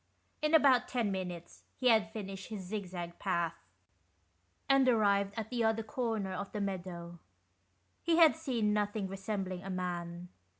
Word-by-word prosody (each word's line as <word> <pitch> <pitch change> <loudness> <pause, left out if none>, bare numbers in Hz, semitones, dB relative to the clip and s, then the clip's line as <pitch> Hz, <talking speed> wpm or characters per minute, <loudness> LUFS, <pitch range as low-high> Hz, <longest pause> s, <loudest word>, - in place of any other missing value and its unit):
In 305 +1 +3
about 275 -5 +5
ten 235 -5 0
minutes 180 -3 -5 0.2
he 255 - +3
had 220 -2 +4
finished 195 -3 -6
his 210 -4 -5
zig 200 +1 -4
zag 175 -1 -6
path 170 -4 0 1.1
and 275 -1 +5
arrived 200 -4 +3
at 220 +1 -4
the 240 -2 0
other 225 0 +2
corner 225 -5 -2
of 200 +2 -5
the 210 - -2
meadow; 175 -3 -4 0.8
he 335 -1 +2
had 325 -3 +7
seen 245 -10 0
nothing 205 -1 0
resembling 195 -1 -4
a 195 - -7
man. 175 -1 -4
200 Hz, 155 wpm, -33 LUFS, 185-225 Hz, 1.1 s, had